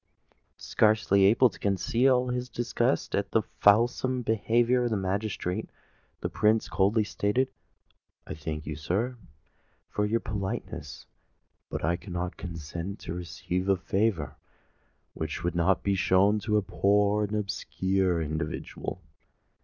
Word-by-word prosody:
Scarcely 105 -3 +3
able 115 +4 +5
to - - -15
conceal 125 +6 +2
his 125 0 -2
disgust 120 +1 -1
at - - -1
this - - +2 0.2
fulsome 120 +4 +3
behaviour 120 +3 +2
of - - +1
the 110 - 0
magistrate, 95 -1 -2 0.5
the - - -1
Prince 110 +1 +2
coldly 105 +3 +2
said, 105 +5 0 0.8
"I - - -6
thank 75 0 -5
you, 75 - -4
sir, 100 - -1 0.8
for 105 0 0
your 115 +2 +1
politeness: 100 -4 -5 0.6
but - - -3
I 85 +2 +1
cannot 90 -1 -4
consent 85 +2 -6
to 80 - -5
receive 90 +2 -3
a 95 - +4
favour 95 -6 -1 0.8
which 80 -1 -4
would 85 -1 0
not 90 +2 +2
be 100 - +1
shown 95 +2 +3
to 105 +1 +1
a 105 - +1
poor 105 +2 +2
and 105 +1 -4
obscure 95 -3 0
individual." 80 +3 -4
100 Hz, 130 wpm, -28 LUFS, 90-110 Hz, 0.8 s, able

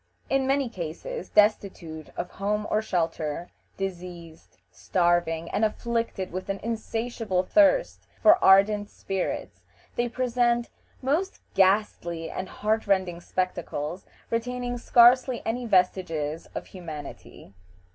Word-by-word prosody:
In 270 -1 +2
many 275 0 +2
cases 210 - -6
destitute 190 -7 +1
of 180 - -4
home 210 +2 -1
or 215 - +2
shelter, 165 -4 -2 0.3
diseased, 175 -4 -7
starving, 170 -2 +1
and 220 - 0
afflicted 230 -3 -1
with 185 +2 -5
an 195 - -1
insatiable 225 -3 -2
thirst 310 - +3
for 330 +3 +6
ardent 205 +2 +5
spirits, 195 -1 -4 0.4
they 240 0 +1
present 240 -1 +1 0.3
most 325 +9 0
ghastly 185 -4 +1
and 185 0 -5
heart 220 +1 -1
rending 185 -3 +1
spectacles, 180 -2 -3 0.2
retaining 245 +1 -2
scarcely 245 +1 +5
any 240 +2 -2
vestiges 180 -6 +1
of - - -4
humanity. 155 - -10
200 Hz, 110 wpm, -26 LUFS, 175-235 Hz, 0.4 s, for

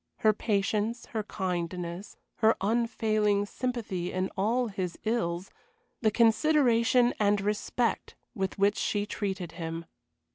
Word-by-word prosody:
Her 215 -2 +5
patience, 210 +2 0
her 220 - -3
kindness, 180 -1 -4 0.2
her 220 0 +4
unfailing 215 -1 +1
sympathy 205 -7 -3
in 185 +1 -1
all 230 +5 +1
his 185 -4 -4
ills, 195 -5 -1 0.5
the 220 - +4
consideration 240 +1 +4
and 205 -1 +3
respect 210 +4 -1 0.2
with 190 -5 -3
which 200 +1 +3
she 205 -1 0
treated 195 -5 -3
him. 165 0 -5
210 Hz, 115 wpm, -29 LUFS, 190-230 Hz, 0.5 s, Her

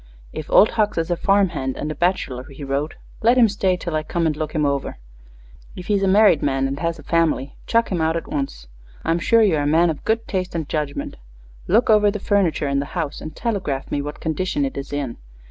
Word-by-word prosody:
"If 155 - -6
Old 210 - +6
Hucks 215 -4 0
is 165 +1 -1
a - - +2
farm 195 +2 +3
hand 130 -5 -4
and 150 - -3
a - - -2
bachelor," 150 -8 -1
he 145 0 -10
wrote, 140 +3 -2 0.3
"let 235 +3 +4
him 240 -2 +7
stay 195 -3 0
till 170 -2 -4
I 155 - +1
come 165 +2 -2
and 155 -2 +1
look 155 0 -4
him 150 -1 +2
over. 140 - -2 0.8
If 180 - -8
he's 205 0 +1
a 195 - +2
married 195 -5 +5
man 135 -1 +1
and 135 +1 -4
has 165 0 -1
a 150 - -12
family, 155 -4 0
chuck 230 0 +2
him 175 -3 0
out 160 +1 +1
at 165 - -6
once. 135 - -4 0.4
I'm 165 +1 +1
sure 225 +6 +4
you 185 -7 +3
are - - 0
a 145 - 0
man 165 +3 +4
of 150 - -8
good 225 +1 0
taste 185 -2 -3
and 160 -3 -2
judgment. 150 -2 -3 0.5
Look 225 +5 +3
over 210 -1 +5
the 205 - -2
furniture 195 -8 +1
in 140 0 +1
the 140 - -3
house 155 -4 -3
and 155 - -8
telegraph 190 - -3
me 145 - 0
what 145 +1 -6
condition 185 - -1
it 270 - -4
is 140 - -6
in. 140 -5 -3
165 Hz, 240 wpm, -21 LUFS, 145-195 Hz, 0.8 s, him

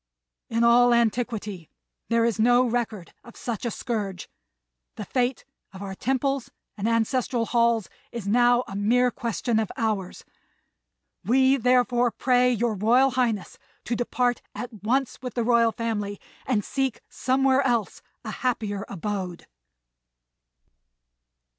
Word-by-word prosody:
In 230 0 +1
all 240 +1 +6
antiquity 220 -6 -1 0.4
there 230 0 +3
is 230 -2 0
no 245 +3 +5
record 225 -7 -3
of 235 - -14
such 235 -1 -4
a - - 0
scourge. 210 -6 -4 0.7
The 210 - -6
fate 250 +2 -1 0.3
of 190 +1 -8
our 195 -1 -5
temples 265 +4 -1 0.3
and 210 +2 -1
ancestral 230 +1 0
halls 235 -2 +2 0.2
is 235 -4 -6
now 245 +3 +4
a 195 - -7
mere 245 +5 +2
question 235 -2 -1
of 220 - -2
hours; 215 -6 -2 1.0
we 260 +3 +4
therefore 245 -1 +3
pray 250 +1 +2
your 235 -1 0
Royal 240 +7 +3
Highness 235 -6 -1 0.2
to 240 - -2
depart 245 +1 0
at 245 0 -6
once 260 +6 -1
with 250 -3 -6
the 240 - 0
Royal 230 -1 +4
Family 210 -3 -3 0.3
and 215 -6 0
seek 270 -4 -2
somewhere 265 +1 +2
else 240 -5 -1 0.2
a - - -4
happier 210 -5 -2
abode." 190 -2 -4
235 Hz, 130 wpm, -25 LUFS, 215-250 Hz, 1.0 s, all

